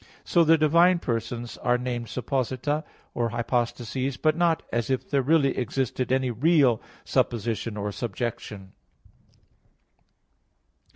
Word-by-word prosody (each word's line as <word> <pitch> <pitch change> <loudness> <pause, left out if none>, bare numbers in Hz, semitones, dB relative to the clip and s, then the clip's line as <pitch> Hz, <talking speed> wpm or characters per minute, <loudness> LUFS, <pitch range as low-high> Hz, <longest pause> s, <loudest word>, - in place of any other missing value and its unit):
So 170 - +3
the 165 0 +5
divine 170 +4 +4
persons 120 -3 -4
are 125 0 +2
named 120 -1 -4
supposita 130 +4 -2 0.3
or 120 -1 0
"hypostases," 120 +2 -2
but 155 -1 +2
not 170 -1 +1
as 120 0 -1
if 130 -1 -1
there 140 -1 +1
really 140 0 +2
existed 130 +1 -2
any 130 -1 +1
real 135 -1 +3 0.2
"supposition" 115 -1 -1
or 105 0 -3
"subjection." 110 -3 -5
125 Hz, 115 wpm, -26 LUFS, 120-145 Hz, 0.3 s, the